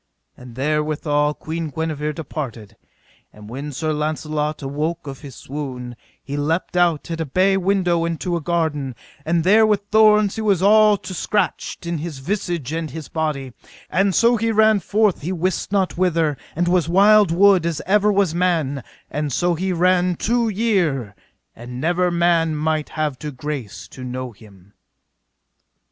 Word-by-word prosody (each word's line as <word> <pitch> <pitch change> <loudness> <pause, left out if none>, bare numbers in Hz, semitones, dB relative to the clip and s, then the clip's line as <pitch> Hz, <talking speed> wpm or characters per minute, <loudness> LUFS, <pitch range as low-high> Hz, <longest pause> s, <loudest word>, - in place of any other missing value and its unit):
And 125 -2 -13
therewithal 150 +1 0
Queen 160 0 -4
Guenever 155 -1 -3
departed. 120 -9 -6 0.6
And 105 0 -13
when 140 +6 -6
Sir 155 +3 -2
Launcelot 150 0 -2
awoke 155 +5 -3
of 135 -2 -8
his 140 -5 -10
swoon, 130 -4 -6 0.3
he 140 - -5
leapt 160 +5 -1
out 170 -3 +1
at 165 0 -3
a - - -1
bay 185 +7 +2
window 185 -3 +1
into 170 +1 -2
a 170 - -2
garden, 150 -6 -1 0.3
and 165 +1 +1
there 210 +5 +5
with 210 -2 +3
thorns 215 -1 +4
he - - -2
was 200 -5 +2
all 210 0 +6
to 185 -1 -8
scratched 185 0 -2
in 170 -2 -2
his 160 -2 -5
visage 170 - -3
and 160 -1 -3
his 160 -1 -8
body; 150 -5 -3 0.4
and 195 -1 +2
so 235 +1 +4
he 225 +1 0
ran 220 -1 +4
forth 205 +2 +1
he 165 +5 -3
wist 185 +1 -2
not 190 -3 0
whither, 165 -5 +2 0.2
and 175 +2 0
was 175 -3 +2
wild 205 +2 +5
wood 190 +1 +5
as 165 -3 -2
ever 210 +2 +3
was 195 -5 +2
man; 165 -7 0 0.3
and 150 -1 -2
so 175 +7 +1
he 185 +3 -2
ran 180 0 +2
two 235 +4 0
year, 180 - 0 0.4
and 125 +2 -8
never 175 +4 +1
man 170 -2 +2
might 155 0 -1
have 150 -4 -3 0.2
grace 135 -6 -5
to 130 - -10
know 125 0 -5
him. 100 -3 -18
165 Hz, 160 wpm, -21 LUFS, 145-185 Hz, 0.6 s, all